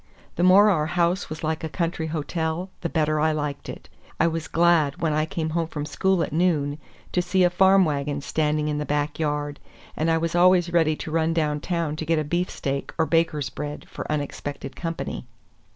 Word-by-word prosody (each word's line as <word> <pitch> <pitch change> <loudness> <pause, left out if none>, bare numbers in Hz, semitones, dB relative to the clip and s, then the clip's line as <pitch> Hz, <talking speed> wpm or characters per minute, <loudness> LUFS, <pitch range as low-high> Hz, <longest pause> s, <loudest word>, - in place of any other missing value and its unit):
The - - -2
more 190 +4 +7
our 155 -4 +1
house 175 +3 0
was 155 +1 -7
like 160 +1 -2
a 160 - -2
country 165 -1 -2
hotel, 160 +3 -3
the 170 - -2
better 155 -2 +1
I 155 +1 +3
liked 150 -2 -4
it. - - -8 0.3
I 165 - +4
was 165 -1 -1
glad, 165 -4 +3
when 160 -2 0
I 155 +1 +1
came 160 -1 -3
home 165 0 0
from 150 -2 -5
school 190 +2 +1
at - - -5
noon, 155 -4 +1 0.3
to 180 - +2
see 185 +1 +2
a 175 - +4
farm 190 +1 +5
wagon 145 -1 -1
standing 150 +1 0
in 150 -1 -1
the - - -1
back 145 +1 -1
yard, 145 -1 -2 0.4
and 160 +2 0
I 165 - +3
was 165 0 -1
always 175 0 +4
ready 160 -2 +3
to 155 - -7
run 165 0 +1
downtown 155 +1 -1
to 160 - -4
get 155 -3 +1
beefsteak 150 -5 -2
or 160 - +3
baker's 155 -2 +1
bread 150 0 -6
for - - -6
unexpected 145 -2 -4
company. 165 -1 -5
160 Hz, 200 wpm, -24 LUFS, 150-170 Hz, 0.4 s, more